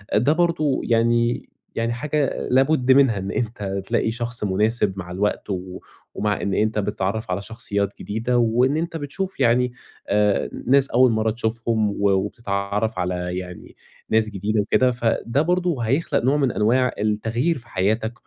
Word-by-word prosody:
ده 130 Hz, +8 st, +4 dB
برضه 165 Hz, -5 st, +1 dB
يعني 115 Hz, +1 st, +1 dB, 0.3 s
يعني 115 Hz, +1 st, -1 dB
حاجة 145 Hz, +2 st, -1 dB
لابد 135 Hz, 0 st, +3 dB
منها 130 Hz, -5 st, +5 dB
إن 95 Hz, 0 st, -4 dB
أنت 105 Hz, -4 st, -3 dB
تلاقي 110 Hz, -, +1 dB
شخص 120 Hz, 0 st, -3 dB
مناسب 105 Hz, +1 st, +1 dB
مع 90 Hz, -1 st, -7 dB
الوقت، 100 Hz, +3 st, -1 dB, 0.7 s
ومع 105 Hz, -1 st, -1 dB
إن 100 Hz, -, -1 dB
أنت 110 Hz, +2 st, +1 dB
بتتعرّف 105 Hz, 0 st, -2 dB
على 90 Hz, +2 st, -1 dB
شخصيّات 100 Hz, -2 st, -3 dB
جديدة، 115 Hz, +4 st, -1 dB
وإن 120 Hz, +5 st, +2 dB
أنت 165 Hz, 0 st, -3 dB
بتشوف 155 Hz, +6 st, -5 dB
يعني 125 Hz, 0 st, +2 dB, 0.3 s
آآ 105 Hz, 0 st, +2 dB, 0.2 s
ناس 135 Hz, +1 st, +4 dB
أول 125 Hz, 0 st, +4 dB
مرّة 110 Hz, 0 st, +1 dB
تشوفهم 110 Hz, -1 st, -1 dB
و 100 Hz, 0 st, +1 dB
وبتتعرف 100 Hz, +1 st, -1 dB
على 90 Hz, 0 st, -2 dB
يعني 90 Hz, -1 st, -8 dB, 0.3 s
ناس 110 Hz, 0 st, +2 dB
جديدة 105 Hz, +1 st, -1 dB
وكده، 125 Hz, +5 st, +2 dB
فده 120 Hz, +2 st, 0 dB
برضه 175 Hz, -4 st, 0 dB
هيخلق 135 Hz, +3 st, 0 dB
نوع 135 Hz, +4 st, +3 dB
من 135 Hz, -4 st, +1 dB
أنواع 125 Hz, +4 st, +2 dB
التغيير 115 Hz, +9 st, 0 dB
في 120 Hz, -, -13 dB
حياتك، 110 Hz, +4 st, 0 dB
115 Hz, 150 wpm, -22 LUFS, 105-130 Hz, 0.7 s, منها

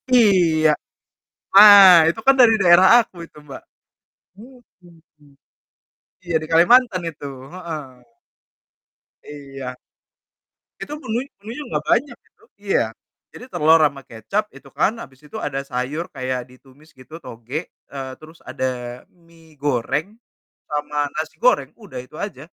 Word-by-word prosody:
Iya, 175 Hz, -9 st, +3 dB, 0.8 s
nah, 200 Hz, -1 st, +10 dB, 0.2 s
itu 170 Hz, -, -4 dB
kan 270 Hz, -, +6 dB
dari 235 Hz, -3 st, +6 dB
daerah 180 Hz, +1 st, +6 dB, 0.2 s
aku 190 Hz, -, -27 dB
itu 155 Hz, -, -22 dB
Mbak, 135 Hz, -, -10 dB, 0.8 s
mhm, 170 Hz, -, -20 dB, 0.9 s
iya, 170 Hz, -2 st, -5 dB
di 155 Hz, -, -6 dB
Kalimantan 185 Hz, +3 st, +4 dB
itu, 155 Hz, -3 st, -11 dB, 0.3 s
heeh. 165 Hz, -5 st, -7 dB, 1.4 s
Iya. 135 Hz, -3 st, -9 dB, 1.0 s
Itu 295 Hz, -, -7 dB
menui 235 Hz, +2 st, -3 dB, 0.2 s
menunya 230 Hz, +8 st, -8 dB
enggak -, -, -3 dB
banyak 245 Hz, -1 st, 0 dB
itu, -, -, -32 dB, 0.2 s
iya. 195 Hz, -, 0 dB, 0.5 s
Jadi, -, -, -12 dB
telur 160 Hz, +2 st, +4 dB
ama 140 Hz, -2 st, -3 dB
kecap 195 Hz, -, -4 dB
itu, -, -, -15 dB
kan, 215 Hz, -, 0 dB
habis 130 Hz, -1 st, -16 dB
itu -, -, -9 dB
ada 135 Hz, -2 st, -3 dB
sayur 130 Hz, +6 st, -4 dB
kayak 130 Hz, -1 st, -4 dB
ditumis 135 Hz, +4 st, -21 dB
gitu 130 Hz, +5 st, -13 dB
tauge, 120 Hz, +9 st, -7 dB, 0.3 s
eee, 135 Hz, -1 st, -7 dB
terus 160 Hz, +1 st, -15 dB
ada 125 Hz, -1 st, -5 dB
mi 165 Hz, -2 st, -23 dB
goreng, 145 Hz, +3 st, -1 dB, 0.6 s
sama 150 Hz, 0 st, -2 dB
nasi 155 Hz, 0 st, -5 dB
goreng, -, -, +2 dB
udah -, -, -9 dB
itu -, -, -18 dB
aja. -, -, -7 dB
160 Hz, 130 wpm, -20 LUFS, 135-195 Hz, 1.4 s, nah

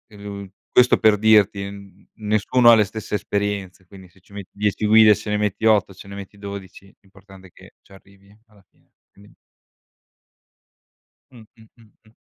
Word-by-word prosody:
mhmm, 100 Hz, -1 st, -9 dB, 0.2 s
questo 125 Hz, 0 st, +4 dB
per 110 Hz, -1 st, +3 dB
dirti, 105 Hz, -2 st, +2 dB
n 100 Hz, -1 st, -15 dB
nessuno 110 Hz, +3 st, +2 dB
ha -, -, +7 dB
le 110 Hz, -, +3 dB
stesse 105 Hz, +1 st, -6 dB
esperienze, 100 Hz, -2 st, -4 dB
quindi 95 Hz, 0 st, -16 dB
se 95 Hz, -, -26 dB
ci 100 Hz, -, -23 dB
metti 100 Hz, -2 st, -10 dB
10 105 Hz, +1 st, -2 dB
guide 110 Hz, 0 st, +6 dB
ce 105 Hz, -, -9 dB
ne 105 Hz, -, -1 dB
metti 105 Hz, +1 st, -3 dB
8, 105 Hz, -3 st, +2 dB
ce 100 Hz, -, -15 dB
ne 100 Hz, -, -10 dB
metti 100 Hz, 0 st, -11 dB
12, 100 Hz, -1 st, -10 dB, 0.2 s
l'importante 95 Hz, -1 st, -18 dB
è 90 Hz, -, -24 dB
che -, -, -18 dB
ci -, -, -28 dB
arrivi 100 Hz, +1 st, -21 dB
alla 105 Hz, -2 st, -25 dB
fine. -, -, -37 dB, 0.2 s
Quindi. 100 Hz, +1 st, -21 dB, 2.0 s
Mh-mh, 115 Hz, -3 st, -16 dB, 0.3 s
mh-mh. 110 Hz, -1 st, -25 dB
100 Hz, 165 wpm, -21 LUFS, 100-105 Hz, 2.0 s, ha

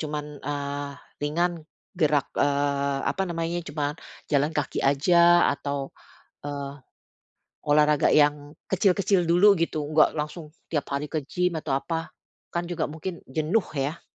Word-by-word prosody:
cuman, 150 Hz, -1 st, -5 dB
eee, 145 Hz, 0 st, -4 dB, 0.3 s
ringan, 170 Hz, +2 st, -1 dB, 0.3 s
gerak, 150 Hz, -4 st, +2 dB
eee, 140 Hz, -1 st, +1 dB
apa 195 Hz, -, 0 dB
namanya, 170 Hz, +1 st, -2 dB
cuman 150 Hz, -2 st, -3 dB, 0.3 s
jalan 145 Hz, +1 st, +2 dB
kaki 150 Hz, -3 st, -2 dB
aja 170 Hz, +5 st, +5 dB
atau, 140 Hz, -1 st, -4 dB, 0.6 s
eee, 140 Hz, -1 st, -5 dB, 0.9 s
olahraga 150 Hz, 0 st, +4 dB
yang 145 Hz, 0 st, +2 dB
kecil-kecil 190 Hz, -1 st, +2 dB
dulu, 180 Hz, +5 st, +6 dB
gitu, 155 Hz, -2 st, -1 dB
nggak 155 Hz, 0 st, +4 dB
langsung 150 Hz, +1 st, -4 dB, 0.2 s
tiap 150 Hz, -3 st, -1 dB
hari 140 Hz, +2 st, -1 dB
ke 155 Hz, -, 0 dB
gym 180 Hz, 0 st, 0 dB
atau 140 Hz, -3 st, -1 dB
apa, 165 Hz, +3 st, -3 dB, 0.4 s
kan 170 Hz, 0 st, -1 dB
juga 175 Hz, -3 st, -2 dB
mungkin 165 Hz, +3 st, -6 dB
jenuh, 160 Hz, +10 st, 0 dB
ya. 140 Hz, +4 st, -2 dB
150 Hz, 130 wpm, -26 LUFS, 145-170 Hz, 0.9 s, dulu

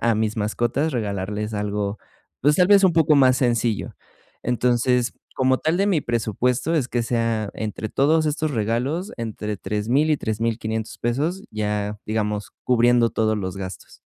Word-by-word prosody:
a 115 Hz, -1 st, +2 dB
mis 110 Hz, 0 st, -1 dB
mascotas 120 Hz, +8 st, 0 dB
regalarles 105 Hz, -1 st, -3 dB
algo, 105 Hz, 0 st, -2 dB, 0.4 s
pues, 145 Hz, +3 st, +4 dB
tal 180 Hz, 0 st, +4 dB
vez 200 Hz, -1 st, +6 dB
un 185 Hz, -, +5 dB
poco 160 Hz, -2 st, +4 dB
más 130 Hz, -2 st, +5 dB
sencillo. 120 Hz, -4 st, 0 dB, 0.5 s
Entonces, 125 Hz, 0 st, +1 dB, 0.2 s
como 130 Hz, 0 st, +2 dB
tal, 160 Hz, +2 st, 0 dB
de 195 Hz, +2 st, +2 dB
mi 185 Hz, -7 st, +2 dB
presupuesto 120 Hz, -, 0 dB
es 135 Hz, -6 st, +1 dB
que 120 Hz, -, 0 dB
sea 115 Hz, -3 st, 0 dB
entre 110 Hz, 0 st, -4 dB
todos 155 Hz, +6 st, +2 dB
estos 155 Hz, +1 st, -1 dB
regalos, 130 Hz, -, -1 dB
entre 105 Hz, -2 st, -4 dB
3000, 110 Hz, +11 st, 0 dB
y 150 Hz, -, +3 dB
3500 110 Hz, -1 st, -3 dB
pesos, 150 Hz, +11 st, -1 dB
ya 105 Hz, -1 st, -2 dB
digamos, 105 Hz, -1 st, -2 dB
cubriendo 120 Hz, -1 st, +4 dB
todos 110 Hz, -1 st, 0 dB
los 95 Hz, -1 st, -4 dB
gastos. 95 Hz, -3 st, -8 dB
115 Hz, 155 wpm, -23 LUFS, 105-135 Hz, 0.5 s, vez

